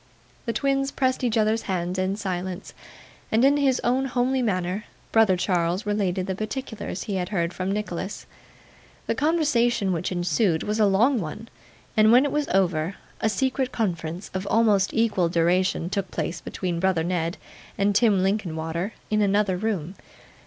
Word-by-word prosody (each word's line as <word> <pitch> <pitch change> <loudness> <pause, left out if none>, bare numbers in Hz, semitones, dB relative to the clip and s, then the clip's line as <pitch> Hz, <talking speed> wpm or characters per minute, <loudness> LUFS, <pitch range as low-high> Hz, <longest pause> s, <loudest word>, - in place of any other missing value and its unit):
The - - +1
twins 275 +3 +1
pressed 260 -2 0
each 235 -2 +1
other's 220 +1 +2
hands 180 0 -1
in 185 +1 0
silence; 185 -2 -4 0.6
and 225 +4 +4
in 285 +1 +5
his 270 -3 +2
own 255 +3 +2
homely 255 +1 0
manner, 185 -2 -1 0.3
brother 220 -5 +4
Charles 180 +1 0
related 195 -3 0
the 190 - -2
particulars 215 -1 -5
he 200 -3 -3
had 180 -1 -2
heard 170 -4 -1
from 185 +1 -2
Nicholas. 200 -2 -4 0.8
The - - 0
conversation 245 - +2
which 175 +2 -2
ensued 175 -1 +1
was 210 +1 -2
a 210 - +5
long 230 +7 +3
one, 210 +8 -7 0.5
and 215 0 +5
when 250 +4 +6
it 285 - -1
was 295 -1 0
over, 180 -2 +1 0.2
a 220 - +1
secret 260 +4 0
conference 175 -4 -3
of 190 +1 -3
almost 210 -3 +3
equal 210 -7 +1
duration 175 +1 +1
took 195 0 -2
place 170 - -3
between 175 -3 -3
brother 185 -3 +1
Ned 170 -1 -1 0.4
and 200 +1 +2
Tim 205 -3 +3
Linkinwater 175 -1 -2 0.2
in 215 0 +2
another 200 -1 +2
room. 185 -4 -2
200 Hz, 160 wpm, -25 LUFS, 180-225 Hz, 0.8 s, when